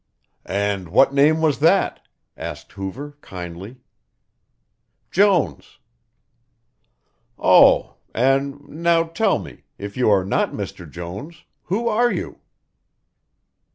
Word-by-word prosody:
"And 100 -2 -2
what 135 +9 +4
name 150 +3 +4
was 155 -3 +1
that?" 170 +6 +2 0.3
asked - - -8
Hoover 135 +10 -7
kindly. 90 +5 -9 1.3
"Jones." 180 - +1 1.6
"Oh, - - +5
and 135 +3 0
now 165 +2 +1
tell 195 +5 0
me, - - -11
if 100 0 -7
you 125 -3 +2
are 95 -3 +3
not 100 - 0
Mr. - - -7
Jones, 100 - -8 0.2
who 225 +6 -1
are 235 +2 +2
you?" - - -5
140 Hz, 100 wpm, -21 LUFS, 100-165 Hz, 1.6 s, Oh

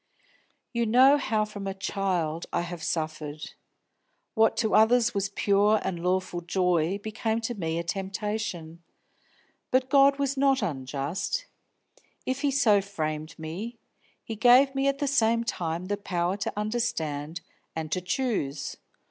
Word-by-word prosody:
"You 235 -1 0
know 260 +5 +6
how 215 -4 0
from 205 -2 -7
a 195 - -3
child 180 -5 -2
I - - 0
have 175 -1 -6
suffered. 155 -2 -4 0.8
What 225 -2 +3
to 220 - +1
others 235 +2 +5
was 200 -1 -1
pure 205 +2 +3
and 175 -3 -3
lawful 180 0 -1
joy 180 0 +1
became 220 +2 -2
to 230 +2 -2
me 165 -6 -3
a 170 - -1
temptation. 190 -2 -4 0.9
But 255 0 +1
God 275 -1 +6
was 280 -1 0
not 270 -3 +2
unjust; 145 - -3 0.8
if 260 +2 -2
He 290 - +2
so 230 -7 +4
framed 155 -4 -4
me, 185 +10 -6 0.5
He 225 - -5
gave 250 +5 +6
me 270 0 +1
at 275 0 +1
the 285 - -1
same 230 -4 +2
time 170 -5 -3
the 205 +2 -2
power 180 -2 -1
to 205 +1 -4
understand 165 -8 -2 0.3
and 160 -1 -4
to 185 - 0
choose. 180 - -2
200 Hz, 145 wpm, -27 LUFS, 170-235 Hz, 0.9 s, know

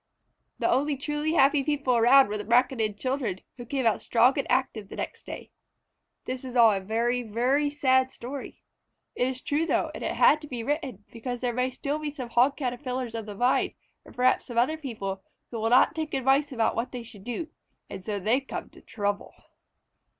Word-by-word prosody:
The - - 0
only 280 +3 +1
truly 295 +2 -2
happy 280 -2 +4
people 280 -4 +1
around 250 +4 +6
were 210 +1 -3
the - - -4
Braconid 230 -2 +2
children, 255 -6 -2 0.2
who 240 -1 -9
came 265 -1 -1
out 225 - +2
strong 240 +3 +4
and 275 - -2
active 245 -5 0
the - - -8
next - - -6
day. - - -8 0.7
This 255 0 -4
is 255 -1 -7
all 230 -2 +7
a 200 - 0
very, 230 +5 0
very 250 +6 +1
sad 260 -3 +2
story. 265 +3 -8 0.5
It 250 - 0
is 260 0 -4
true, 295 +3 0
though, - - +1
and - - -7
it - - -1
had 305 - +5
to 300 - -9
be 245 -4 -5
written, 275 - -3
because 245 +1 -5
there 245 -1 0
may 250 +2 0
still 280 +3 -3
be 305 -1 -3
some 265 -5 -7
Hog 255 +4 +3
Caterpillars 250 -2 -3
of 225 -2 -5
the 205 - -7
Vine, 245 +5 +1 0.3
or - - -15
perhaps 255 +1 +2
some 240 - -6
other 255 +7 +3
people, 215 -10 -5 0.3
who 230 - -4
will 225 +1 0
not 250 +2 +5
take 310 -2 -3
advice 270 +2 +2
about 230 -4 +1
what 230 +2 -2
they 245 -2 -6
should 215 -4 -13
do, 245 - -4 0.4
and 185 - -8
so 205 +1 -3
they 220 +7 +2
come 270 - -7
to - - -16
trouble. 205 -2 -3
250 Hz, 205 wpm, -27 LUFS, 230-275 Hz, 0.7 s, all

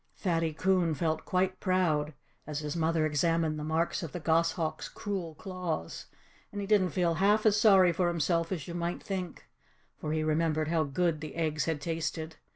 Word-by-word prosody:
Fatty 165 -4 0
Coon 180 0 +1
felt 160 +1 -1
quite 185 0 0
proud, 160 -6 +1 0.3
as 150 -1 -3
his 150 0 -4
mother 165 -1 +1
examined 155 +1 +1
the - - -4
marks 160 +2 0
of 165 -5 -6
the 175 - -4
goshawk's 165 0 0
cruel 185 -6 -4
claws. 180 - -5 0.4
And 205 - -5
he 200 - -2
didn't 195 -3 +3
feel 170 +1 +1
half 205 +6 +3
as 210 -1 +4
sorry 190 -5 +6
for 175 +1 +1
himself 165 0 0
as 175 -4 -3
you 170 - -6
might 175 0 -3
think, 185 -3 -5 0.5
for 150 - -3
he 155 0 0
remembered 155 0 +1
how 160 -2 +2
good 155 +2 0
the 155 -2 -7
eggs 155 -2 0
had 160 -2 -1
tasted. 160 -1 -3
165 Hz, 180 wpm, -30 LUFS, 155-180 Hz, 0.5 s, sorry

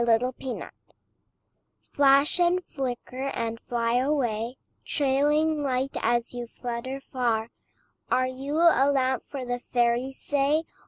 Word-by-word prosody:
THE 230 -1 +5
FIREFLY 255 0 -4 1.3
Flash 280 +4 +5
and 355 +1 +2
flicker 260 0 -4
and 230 0 -3
fly 235 0 -1
away, 250 -4 -1 0.3
Trailing 295 +2 +1
light 265 -1 -1
as 240 0 0
you 240 -1 -5
flutter 245 +3 -5
far, 235 -4 -1 0.6
Are 255 - +2
you 265 +3 -4
a 320 -4 +5
lamp 260 -2 +1
for 270 -3 -7
the 245 0 -2
fairies, 245 +2 0
say? 290 +2 +1
260 Hz, 120 wpm, -26 LUFS, 240-280 Hz, 1.3 s, THE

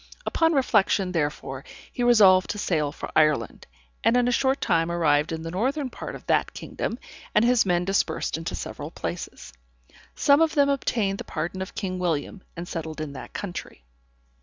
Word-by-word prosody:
Upon 325 0 +2
reflection, 215 -8 +2
therefore, 145 -5 -2 0.3
he - - -4
resolved 205 -6 +6
to - - -3
sail 155 -8 0
for - - -7
Ireland, 150 -7 +2 0.4
and 240 - +4
in 245 0 +3
a - - +2
short 265 +2 +2
time 165 0 +1
arrived 150 -3 +2
in 160 0 -4
the 165 - -5
northern 260 - -1
part - - -7
of - - -11
that - - +1
kingdom, - - -4 0.4
and 210 - +5
his 240 -4 +4
men 175 -1 +2
dispersed 195 +1 0
into 165 +2 -4
several 145 +1 -6
places. 170 +1 -6 0.6
Some 285 +2 +4
of 325 0 +2
them 285 -1 +4
obtained 220 -8 0
the - - -4
pardon 175 +3 -4
of 190 - -6
King 185 -2 -3
William, 175 +3 -2 0.2
and 170 +1 -5
settled 160 -2 -5
in 155 -2 -5
that 130 - -9
country. 175 - -6
185 Hz, 180 wpm, -25 LUFS, 160-240 Hz, 0.6 s, resolved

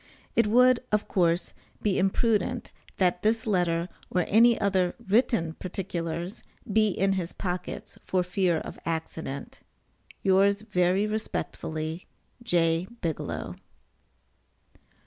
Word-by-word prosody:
It 230 -2 +4
would, 250 +3 +5
of 210 -1 +1
course, 170 -1 +1 0.3
be 200 -3 +2
imprudent, 205 +3 +1 0.3
that 180 -1 +2
this 220 +1 +1
letter, 175 -5 +1 0.2
or 180 -2 +1
any 230 +2 +5
other 190 -3 +1
written 195 -6 +2
particulars, 175 0 -4 0.3
be 215 0 +5
in 195 0 +1
his 180 -3 -2
pockets 180 -2 -5
for 185 -1 +1
fear 180 -1 +1
of - - -7
accident. 160 -4 -4 0.6
Yours 200 +2 +4
very 185 -1 +2
respectfully, 165 -6 -4 0.3
J. 170 -5 +2
BIGELOW. 165 -4 -3
185 Hz, 110 wpm, -27 LUFS, 170-210 Hz, 0.6 s, would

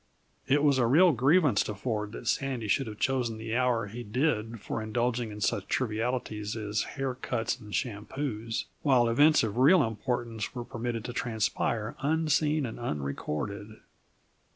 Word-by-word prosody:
It 145 +2 +3
was 140 -3 +4
a 120 - +3
real 170 +8 +6
grievance 140 - +4
to 105 - -4
Ford 105 -1 -3
that 120 - -8
Sandy 130 -3 -1
should 135 +5 +1
have 105 -1 -7
chosen 125 -4 0
the 110 +1 -4
hour 125 -3 +2
he 110 +4 -7
did 115 -1 -1
for 110 - -4
indulging 120 +1 -1
in 105 0 -8
such 100 0 0
trivialities 110 -2 -2
as 105 -1 -1 0.2
hair 135 -1 -1
cuts 120 -1 -2
and 105 -3 -12
shampoos, 115 +1 -3 0.2
while 130 -5 +4
events 145 +6 +5
of 110 0 -2
real 150 +9 +6
importance 115 0 -3
were 120 -1 -4
permitted 120 -2 -4
to 120 - -5
transpire 110 -1 -1
unseen 155 0 +1
and 115 - -6
unrecorded. 100 +4 -4
120 Hz, 155 wpm, -29 LUFS, 110-130 Hz, 0.2 s, real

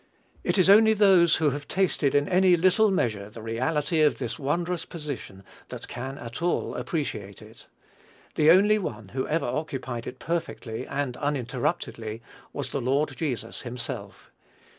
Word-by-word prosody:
It - - 0
is 185 - +4
only 220 +2 +7
those 190 -5 +5
who 155 -3 +2
have 145 +1 -6
tasted 180 -7 +1
in 145 0 +3
any 185 -1 +4
little 190 +5 +4
measure 110 - -1
the 110 +1 -10
reality 145 +8 0
of 150 -1 +4
this 125 +3 -4
wondrous 170 +4 -1
position 140 - -7 0.3
that - - -8
can 130 +3 -6
at 115 +3 -8
all 175 +1 0
appreciate 105 - -4
it. 110 +1 -15 0.7
The 155 0 +4
only 205 +5 +6
one 110 - -6
who 130 +4 -3
ever 160 +2 0
occupied 125 -3 -4
it 130 - -7
perfectly 160 -9 -4
and 140 -3 -3
uninterruptedly 125 -4 -2 0.3
was - - -4
the - - -2
Lord 135 +3 0
Jesus 130 -5 -4
himself. 120 -4 -7
145 Hz, 155 wpm, -26 LUFS, 120-170 Hz, 0.7 s, only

